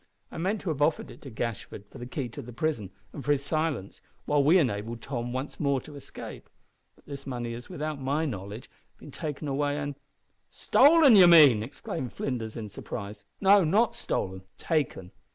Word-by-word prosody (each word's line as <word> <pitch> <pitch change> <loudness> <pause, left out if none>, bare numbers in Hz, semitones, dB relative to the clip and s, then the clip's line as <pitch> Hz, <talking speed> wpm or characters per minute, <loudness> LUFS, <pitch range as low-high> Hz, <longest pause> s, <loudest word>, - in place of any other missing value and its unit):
I - - -7
meant 195 +5 -1
to 190 - -4
have 150 -2 -3
offered 155 +2 +1
it - - -14
to 135 - -9
Gashford 110 -3 -5
for 135 - -11
the 120 - -7
key 135 +1 -3
of - - -7
the - - -8
prison, 120 - -2 0.2
and 140 - -7
for 145 - +3
his 140 -1 -3
silence, 155 - -2 0.2
while 145 -1 +2
we 160 +6 +6
enabled 115 - -1
Tom 120 -2 -4
once 130 +3 -5
more 140 -3 +1
to 150 - -12
escape. 140 - -10 0.5
But - - -26
this 140 -1 -8
money 120 -3 -4
has, 120 +1 -9
without 155 -5 -4
my 145 +4 0
knowledge, 105 -3 -6 0.3
been - - -12
taken 150 -1 -5
away 145 +1 0
and 145 -1 -3 0.4
" - - -44 0.2
"Stolen, 290 -2 +7
you 185 -3 +9
mean!" 150 -10 +8
exclaimed 125 +1 -6
Flinders, 115 -5 -4
in 110 -2 -5
surprise. 100 0 -8 0.2
"No, 200 0 +6
not 210 +9 +2
stolen 95 0 -3 0.2
taken! 140 - -2
140 Hz, 190 wpm, -28 LUFS, 120-155 Hz, 0.5 s, you